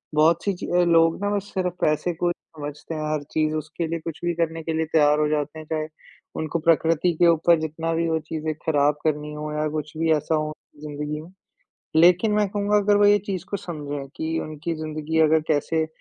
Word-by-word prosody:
बहुत-सी 165 Hz, +6 st, +3 dB
ची 180 Hz, -, -7 dB
अ, 175 Hz, 0 st, +3 dB
लोग 165 Hz, 0 st, +3 dB
ना 205 Hz, -, +1 dB
बस 200 Hz, 0 st, -4 dB
सिर्फ़ 180 Hz, -2 st, -1 dB
पैसे 155 Hz, +3 st, +1 dB
को 175 Hz, +2 st, -1 dB
ही 175 Hz, -, +1 dB, 0.2 s
समझते 150 Hz, +2 st, -6 dB
हैं 155 Hz, 0 st, -2 dB
हर 150 Hz, -2 st, -2 dB
चीज़ 155 Hz, -1 st, +1 dB
उसके 155 Hz, +2 st, -3 dB
लिए 165 Hz, 0 st, -3 dB
कुछ 160 Hz, -1 st, -7 dB
भी 175 Hz, -, +1 dB
करने 165 Hz, -1 st, -1 dB
के 160 Hz, 0 st, -2 dB
लिए 160 Hz, 0 st, 0 dB
तैयार 150 Hz, -1 st, +4 dB
हो 150 Hz, -, +2 dB
जाते 150 Hz, +1 st, -2 dB
हैं 155 Hz, -, -9 dB
चाहे 155 Hz, 0 st, -2 dB, 0.5 s
उनको 160 Hz, +1 st, -2 dB
प्रकृति 165 Hz, +1 st, +2 dB
के 175 Hz, -, +7 dB
ऊपर 170 Hz, 0 st, +4 dB
जितना 160 Hz, +1 st, -3 dB
भी 165 Hz, +1 st, 0 dB
वो 160 Hz, 0 st, +1 dB
चीज़ें 155 Hz, 0 st, -4 dB
खराब 150 Hz, -2 st, +3 dB
करनी 150 Hz, -1 st, -1 dB
हो 150 Hz, 0 st, -5 dB
या 150 Hz, 0 st, 0 dB
कुछ 150 Hz, +1 st, -6 dB
भी 160 Hz, 0 st, +1 dB
ऐसा 155 Hz, +1 st, 0 dB
हो 155 Hz, 0 st, -1 dB, 0.3 s
ज़िंदगी 150 Hz, 0 st, -4 dB
में। 165 Hz, +3 st, -13 dB, 0.7 s
लेकिन 180 Hz, +6 st, +5 dB
मैं 210 Hz, -1 st, +2 dB
कहूँगा 205 Hz, +1 st, +1 dB
अगर 205 Hz, 0 st, +4 dB
वो 205 Hz, -, +4 dB
ये 205 Hz, 0 st, +6 dB
चीज़ 190 Hz, -4 st, -5 dB
को 200 Hz, -, 0 dB
समझें, 145 Hz, -6 st, -6 dB
कि 160 Hz, 0 st, -2 dB
उनकी 155 Hz, +2 st, -4 dB
ज़िंदगी 155 Hz, 0 st, -3 dB
अगर 160 Hz, 0 st, +5 dB
कैसे 160 Hz, +1 st, +1 dB
160 Hz, 215 wpm, -24 LUFS, 155-170 Hz, 0.7 s, के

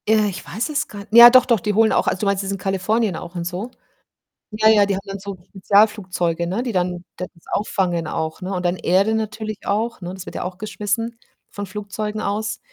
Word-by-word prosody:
Äh, 215 Hz, -1 st, +4 dB
ich 190 Hz, -, -7 dB
weiß 225 Hz, -, -3 dB
es 300 Hz, -1 st, -1 dB
grad 200 Hz, -1 st, -10 dB
ja, 235 Hz, +2 st, +11 dB
doch, 255 Hz, 0 st, +6 dB
doch, 235 Hz, -4 st, +3 dB
die 210 Hz, +3 st, -1 dB
holen 220 Hz, +1 st, +4 dB
auch -, -, +1 dB
also, 185 Hz, -, 0 dB
du -, -, 0 dB
meinst, 200 Hz, 0 st, +1 dB
das 195 Hz, -, -3 dB
in 195 Hz, -, -2 dB
Kalifornien 195 Hz, +2 st, 0 dB
auch 170 Hz, +2 st, -8 dB
und 170 Hz, -1 st, -3 dB
so? 185 Hz, +8 st, -4 dB, 0.8 s
Ja, 215 Hz, +1 st, +3 dB
ja, 215 Hz, -2 st, +6 dB
die 200 Hz, 0 st, 0 dB
haben 190 Hz, -, -3 dB
dann 195 Hz, 0 st, -5 dB
so 200 Hz, -1 st, -6 dB
Spezialflugzeuge, 190 Hz, -4 st, +1 dB
ne, 190 Hz, +7 st, -2 dB
die 245 Hz, -, -2 dB
dann 180 Hz, -2 st, -1 dB
das 180 Hz, -, -5 dB, 0.2 s
auffangen 180 Hz, -5 st, 0 dB
auch, 160 Hz, 0 st, -3 dB
ne, 185 Hz, +1 st, -4 dB
und 180 Hz, -1 st, -3 dB
dann 175 Hz, +1 st, 0 dB
Erde 195 Hz, +5 st, +2 dB
natürlich 215 Hz, -1 st, -4 dB
auch, 220 Hz, +3 st, -1 dB
ne, 180 Hz, -1 st, -6 dB
das 190 Hz, 0 st, -9 dB
wird -, -, -8 dB
ja -, -, -4 dB
auch 180 Hz, 0 st, -5 dB
geschmissen 215 Hz, +2 st, -3 dB, 0.3 s
von 205 Hz, -1 st, -6 dB
Flugzeugen 210 Hz, +2 st, -5 dB
aus. 210 Hz, +1 st, -2 dB
200 Hz, 225 wpm, -21 LUFS, 185-215 Hz, 0.8 s, ja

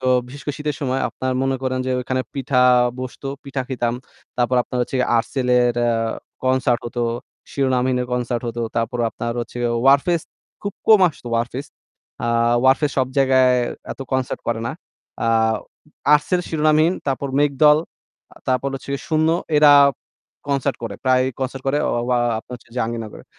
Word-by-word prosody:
তো 130 Hz, -, -3 dB, 0.2 s
বিশেষ 140 Hz, +3 st, -10 dB
করে 145 Hz, -, -3 dB
শীতের 150 Hz, -1 st, -3 dB
সময় 135 Hz, -1 st, -1 dB
আপনার 130 Hz, 0 st, -3 dB
মনে 135 Hz, 0 st, 0 dB
করেন 130 Hz, 0 st, -1 dB
যে -, -, -1 dB
ওইখানে 130 Hz, +1 st, -1 dB
পিঠা 130 Hz, -2 st, +1 dB, 0.4 s
বসতো, 130 Hz, +2 st, -6 dB, 0.2 s
পিঠা 135 Hz, -1 st, -3 dB
খেতাম। 120 Hz, -3 st, -1 dB, 0.4 s
তারপর 125 Hz, +1 st, +1 dB
আপনার 125 Hz, -, -5 dB
হচ্ছে 125 Hz, -, -3 dB
গিয়ে 125 Hz, -, +3 dB
যে -, -, +1 dB
'Artcell' 125 Hz, +2 st, -1 dB
এর 120 Hz, -1 st, +2 dB
অ্যা 120 Hz, 0 st, +2 dB, 0.5 s
কনসার্ট 130 Hz, -2 st, +2 dB
হতো, 120 Hz, 0 st, -3 dB, 0.5 s
'Shironamhin' 130 Hz, -2 st, +1 dB
এর -, -, -5 dB
কনসার্ট 120 Hz, -1 st, -1 dB
হতো। 120 Hz, 0 st, -3 dB
তারপর 120 Hz, +2 st, -1 dB
আপনার 115 Hz, 0 st, -4 dB
হচ্ছে 120 Hz, -, -7 dB, 0.3 s
'Warfaze' 145 Hz, +5 st, +4 dB, 0.4 s
খুব 205 Hz, -, -3 dB
কম 215 Hz, -2 st, +7 dB
আসতো 145 Hz, -5 st, -13 dB
'Warfaze' 120 Hz, +5 st, -3 dB, 0.5 s
আ -, -, 0 dB, 0.4 s
'Warfaze' 135 Hz, +3 st, +3 dB
সব 130 Hz, -, +2 dB
জায়গায় 130 Hz, -1 st, +4 dB, 0.4 s
এত -, -, -16 dB
কনসার্ট 130 Hz, -1 st, -1 dB
করে 115 Hz, -1 st, -1 dB
না। 120 Hz, -, -3 dB, 0.5 s
আ -, -, +1 dB, 0.9 s
'Artcell', 175 Hz, +4 st, +1 dB
'Shironamhin' 155 Hz, +2 st, +3 dB
তারপর 140 Hz, +1 st, -1 dB
'মেঘদল' 150 Hz, +1 st, +4 dB, 0.5 s
আ -, -, -44 dB
তারপর 130 Hz, +1 st, +1 dB
হচ্ছে 135 Hz, +1 st, -7 dB, 0.2 s
'শূন্য' 160 Hz, 0 st, +2 dB, 0.3 s
এরা 150 Hz, -1 st, +7 dB, 0.8 s
কনসার্ট 140 Hz, 0 st, 0 dB
করে, 100 Hz, -3 st, -5 dB
প্রায়ই 130 Hz, 0 st, +3 dB
কনসার্ট 130 Hz, 0 st, -3 dB
করে 140 Hz, +2 st, +2 dB
অ -, -, +1 dB, 0.2 s
য়া 125 Hz, -, +3 dB, 0.2 s
আপনার 125 Hz, -, -9 dB
হচ্ছে 115 Hz, -, -24 dB
জাহাঙ্গীরনগরে। 115 Hz, -2 st, -4 dB
130 Hz, 165 wpm, -21 LUFS, 125-140 Hz, 0.9 s, কম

